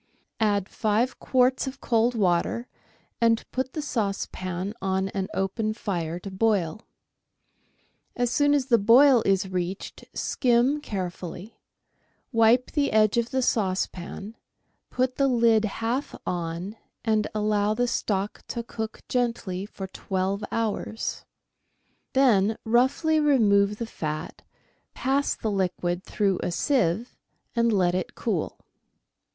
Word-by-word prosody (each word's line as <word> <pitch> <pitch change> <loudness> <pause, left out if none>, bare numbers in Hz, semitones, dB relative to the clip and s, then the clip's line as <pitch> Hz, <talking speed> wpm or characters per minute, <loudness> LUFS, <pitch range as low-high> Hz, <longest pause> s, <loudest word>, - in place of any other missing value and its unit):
Add 205 -3 +1
five 220 +4 0
quarts 255 +1 +2
of 265 +1 -6
cold 235 +1 +2
water, 200 +4 +1 0.5
and 230 -1 +3
put 260 0 -2
the 305 - -3
saucepan 195 -5 -3
on 190 0 0
an 195 -1 -3
open 215 +3 -1
fire 170 -7 -3
to 195 - -7
boil. 195 -2 0 1.3
As 245 -1 0
soon 290 +2 +3
as 275 -3 +1
the 240 -3 +4
boil 245 +4 +6
is 195 -1 +2
reached 185 +1 -4
skim 255 +4 +2
carefully; 185 - -6 0.7
wipe 230 +1 +4
the 290 -2 +1
edge 215 0 +3
of 235 0 -1
the 260 -1 0
saucepan; 195 0 -2 0.5
put 255 0 -1
the 275 - +3
lid 230 -3 +4
half 230 +6 -2
on, 175 +4 -3 0.3
and 215 -1 +2
allow 210 0 +1
the 245 +2 +1
stock 205 -3 -2
to 235 - -4
cook 220 -1 -6
gently 230 -6 -1
for 195 - -7
twelve 190 +1 -2
hours; 225 0 -2 0.9
then 225 -6 +4
roughly 265 +7 +3
remove 210 -8 +3
the 230 - -3
fat; 155 -7 -5 0.5
pass 275 +2 +1
the 220 - -3
liquid 180 -2 -1
through 195 -3 0
a - - -1
sieve, 225 - 0 0.4
and 235 0 +3
let 180 -4 +2
it 185 - -3
cool. - - -2
215 Hz, 125 wpm, -26 LUFS, 190-245 Hz, 1.3 s, boil